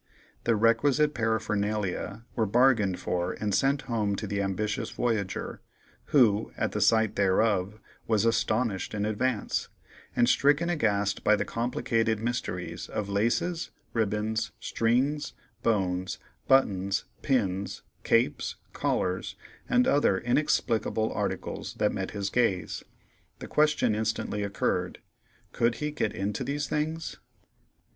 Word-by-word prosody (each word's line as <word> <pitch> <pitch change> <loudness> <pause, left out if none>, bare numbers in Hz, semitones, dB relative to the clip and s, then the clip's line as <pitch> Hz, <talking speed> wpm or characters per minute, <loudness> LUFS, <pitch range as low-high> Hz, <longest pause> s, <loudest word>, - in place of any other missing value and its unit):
The 115 - +3
requisite 130 +7 +3
paraphernalia 105 -2 -1
were 110 - +1
bargained 115 -4 +3
for 90 0 -1
and 105 -2 -2
sent 135 +5 +2
home 105 -4 0
to 105 - -4
the 100 -1 -1
ambitious 105 +2 -2
voyager, 110 -6 -2 0.4
who, 110 -7 +3
at - - 0
the - - -2
sight 110 -2 +3
thereof, 100 +1 +2 0.3
was 110 -1 +2
"astonished" 110 -2 0
in 105 0 -1
advance, 110 +2 -1 0.5
and 120 - +4
stricken 150 +5 +3
aghast 105 - 0
by 105 - +5
the - - -1
complicated 115 -2 0
mysteries 90 -7 -3
of 105 -2 -3
laces, 120 - 0 0.2
ribbons, 110 0 0
strings, 130 +6 0 0.3
bones, 95 -4 0 0.3
buttons, 100 -7 +2 0.2
pins, 100 -8 -1 0.2
capes, - - +1 0.2
collars, 90 0 -1 0.3
and 250 0 +4
other 140 -9 +3
inexplicable 120 -3 +1
articles - - -3
that - - +1
met - - -3
his 100 -1 -3
gaze. 95 -9 0 0.6
The - - -8
question 150 -6 +2
instantly 110 -1 -1
occurred, 100 0 -1 0.5
"Could 115 0 +1
he 150 0 -3
get 130 -7 -1
into 100 +1 -2
these 145 +1 -2
things?" 160 +2 -2
110 Hz, 120 wpm, -28 LUFS, 100-125 Hz, 0.6 s, by